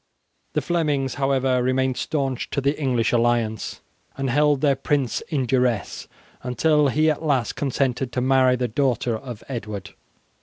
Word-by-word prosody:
The - - 0
Flemings, 150 -6 0
however, 135 -2 +2
remained 130 +1 +1
stanch 135 -5 -2
to - - -1
the 140 +2 +1
English 125 -4 +1
alliance, 115 -2 0 0.4
and 135 -2 -1
held 145 0 +3
their 140 -2 +3
prince 135 -1 -1
in 140 -6 0
duresse 125 -4 0 0.3
until 150 +4 +2
he 155 +4 +3
at 150 - -4
last 135 -8 0
consented 135 -2 -1
to - - 0
marry 130 0 +4
the 125 0 -1
daughter 125 -1 0
of 120 -1 -8
Edward. 105 -6 -6
130 Hz, 150 wpm, -23 LUFS, 120-140 Hz, 0.4 s, marry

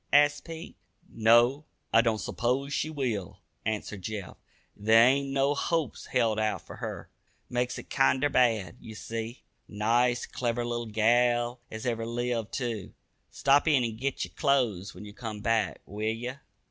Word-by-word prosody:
asked 145 0 +4
Pete. 165 -1 -8 0.3
"No; 120 +6 +4 0.3
I 115 - +7
don't 115 -2 +1
s'pose 130 +6 -1
she 150 +1 0
will," 120 - -3 0.3
answered 105 -2 -3
Jeff. 100 -2 -5 0.4
"There 110 +3 +6
ain't 140 +1 +2
no 135 +1 +2
hopes 160 -1 -1
held 110 -2 +1
out 110 0 -1
fer - - -10
her. - - -6 0.4
Makes 125 0 -1
it - - -10
kinder 135 +1 +3
bad, 115 -6 +2
ye 110 - -10
see. 115 +3 -6 0.2
Nice, 120 +4 +1
clever 120 -1 -2
little 120 -1 -3
gal 120 +2 +2
as 110 0 -7
ever 115 -2 -1
lived, 120 -1 -2
too. 115 -7 -4 0.3
Stop 140 +3 +3
in 140 -5 +4
an' 115 -2 -2
git 135 +3 -2
yer - - -14
clo'es 120 - +1
when 105 - -9
ye 105 - -10
come 110 -2 -6
back, 110 0 0
will 105 +1 -8
ye?" 115 +3 -2
120 Hz, 160 wpm, -28 LUFS, 110-130 Hz, 0.4 s, I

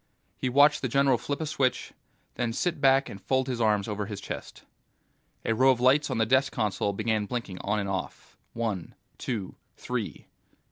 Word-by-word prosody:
He 130 - -2
watched 145 +3 +5
the 130 - 0
general 135 -1 +3
flip 145 +2 -3
a - - -1
switch, 135 -5 -1 0.4
then 120 -2 -2
sit 170 +3 -1
back 135 0 +5
and 95 - -9
fold 130 +6 +1
his 125 -2 -3
arms 105 -3 +2
over 105 -1 -3
his 105 -2 -5
chest. - - -7 0.8
A 115 - +2
row 130 +4 +4
of 130 -2 +3
lights 140 +4 +4
on 130 - -1
the 110 - +3
desk 130 +3 +3
console 105 -3 0
began 110 0 -1
blinking 115 -7 -4
on 105 +2 -1
and 100 -1 -1
off, 95 -2 -5 0.2
one, 110 -7 -3 0.2
two, 110 -7 -3 0.2
three - - -4
120 Hz, 185 wpm, -28 LUFS, 105-135 Hz, 0.8 s, watched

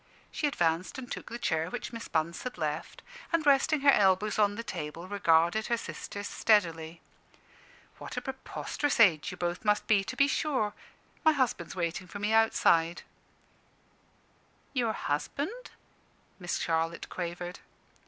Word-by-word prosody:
She 300 - 0
advanced 170 - 0
and 250 -2 -8
took - - -6
the 235 - -5
chair 160 -6 0
which 245 0 -5
Miss 230 0 -6
Bunce 160 +1 -1
had 255 -6 -6
left, 155 -1 -4 0.3
and 335 -2 +1
resting 285 +1 +4
her 280 0 +7
elbows 205 0 +3
on 205 -1 +3
the 230 - -5
table, 165 -4 -6
regarded 185 +1 +3
her 235 - +1
sisters 205 -2 -6
steadily. 165 -6 +1 1.0
"What - - -8
a - - 0
preposterous 265 +1 -3
age 175 -9 +5
you - - -7
both 175 0 -2
must 210 -1 +2
be, 205 -3 +3
to 190 - -5
be 280 - +4
sure! 265 -8 0 0.5
My 315 - +6
husband's 250 - -1
waiting 175 +1 -2
for 205 - -7
me 210 +2 0
outside." 175 -6 +3 1.7
"Your 235 -5 +1
husband?" 290 - -3 0.7
Miss 175 -2 -2
Charlotte 165 0 -1
quavered. 175 0 -5
205 Hz, 145 wpm, -30 LUFS, 170-240 Hz, 1.7 s, her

